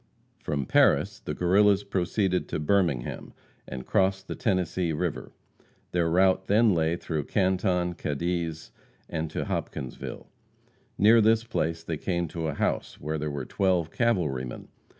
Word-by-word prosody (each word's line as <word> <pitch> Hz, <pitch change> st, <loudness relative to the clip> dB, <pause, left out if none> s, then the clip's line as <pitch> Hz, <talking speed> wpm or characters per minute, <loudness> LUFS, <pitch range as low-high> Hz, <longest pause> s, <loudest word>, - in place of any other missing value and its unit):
From 70 Hz, -2 st, -2 dB
Paris -, -, +3 dB
the -, -, -5 dB
Guerrillas 100 Hz, +3 st, +4 dB
proceeded 95 Hz, -1 st, 0 dB
to -, -, -3 dB
Birmingham, 75 Hz, -6 st, 0 dB, 0.3 s
and 65 Hz, -1 st, -6 dB
crossed 95 Hz, 0 st, +1 dB
the -, -, -3 dB
Tennessee 90 Hz, -4 st, 0 dB
river. 85 Hz, 0 st, -3 dB, 0.6 s
Their 85 Hz, -2 st, +1 dB
route 95 Hz, +2 st, +3 dB
then 110 Hz, +1 st, +4 dB
lay 80 Hz, 0 st, +1 dB
through 80 Hz, -4 st, -3 dB
Canton, 95 Hz, -2 st, +1 dB
Cadiz, 85 Hz, +1 st, -3 dB, 0.4 s
and 80 Hz, 0 st, -3 dB
to -, -, -3 dB
Hopkinsville. 65 Hz, -, -5 dB, 0.7 s
Near 110 Hz, +3 st, +6 dB
this 110 Hz, +1 st, +4 dB
place 80 Hz, -8 st, -2 dB
they 80 Hz, -, -3 dB
came 85 Hz, +1 st, -1 dB
to 80 Hz, 0 st, -3 dB
a 75 Hz, -, -3 dB
house -, -, -2 dB
where 75 Hz, +2 st, -3 dB
there 75 Hz, +1 st, -2 dB
were 70 Hz, -3 st, -4 dB
twelve 90 Hz, -4 st, 0 dB
cavalrymen. 75 Hz, -, -1 dB
90 Hz, 140 wpm, -27 LUFS, 80-95 Hz, 0.7 s, Near